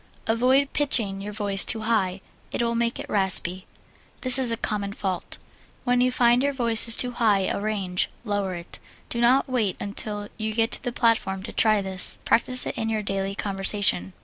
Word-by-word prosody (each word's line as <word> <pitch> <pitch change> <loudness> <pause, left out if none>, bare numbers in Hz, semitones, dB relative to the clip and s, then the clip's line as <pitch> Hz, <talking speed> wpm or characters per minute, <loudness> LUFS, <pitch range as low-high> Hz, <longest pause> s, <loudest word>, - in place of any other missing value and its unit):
Avoid 255 +5 +1
pitching 220 -9 +3
your 205 +1 -7
voice 200 -2 +3
too 220 - +2
high 195 -4 -1 0.3
it - - -4
will 235 0 -1
make 235 0 -2
it - - -8
raspy. 190 -1 +3 0.5
This 255 0 +4
is 255 -2 0
a 230 - -1
common 205 -2 -3
fault. 190 -3 -5 0.5
When 245 -1 +1
you 255 0 +2
find 240 0 +2
your 280 +1 -1
voice 235 -3 +3
in 230 - +7
too 250 - +1
high 220 -5 +1
a 190 - -2
range, 195 -4 -2
lower 205 -4 -3
it. 170 0 -9 0.3
Do 235 - -3
not 250 +3 +3
wait 230 -7 -2
until 205 +1 -3
you 215 -1 -4
get 225 +1 0
to - - +1
the 245 - -3
platform 225 -6 -1
to - - -8
try 215 -2 +2
this. 190 -1 +1
Practise 255 +2 +3
it - - -5
in 225 - -3
your 215 -1 -2
daily 195 0 -4
conversation. 195 - 0
215 Hz, 195 wpm, -23 LUFS, 195-235 Hz, 0.5 s, in